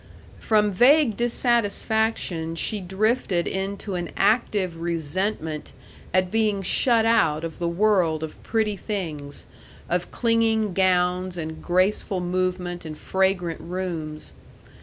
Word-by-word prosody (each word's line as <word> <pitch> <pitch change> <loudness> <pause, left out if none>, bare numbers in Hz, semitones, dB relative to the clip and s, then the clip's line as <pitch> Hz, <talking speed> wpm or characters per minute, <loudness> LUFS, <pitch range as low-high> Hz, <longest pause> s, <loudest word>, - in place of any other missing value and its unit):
From 210 -2 +2
vague 250 +4 +5
dissatisfaction 220 -7 0
she 210 +5 -1
drifted 190 -1 0
into 195 +1 -3
an 175 -2 -3
active 200 -4 +1
resentment 165 -1 -2 0.4
at 185 0 +2
being 215 -3 +1
shut 230 +3 +3
out 160 -9 +3
of 165 -1 -6
the 170 - -1
world 170 -4 +2
of 160 - -7
pretty 220 -2 0
things, 160 -9 -5 0.4
of 175 0 -1
clinging 225 -3 +1
gowns 180 -1 +1
and 160 -1 -5
graceful 185 +1 +1
movement 180 0 -2
and 155 -1 -7
fragrant 190 -3 0
rooms. 170 -4 -5
185 Hz, 115 wpm, -24 LUFS, 170-215 Hz, 0.4 s, vague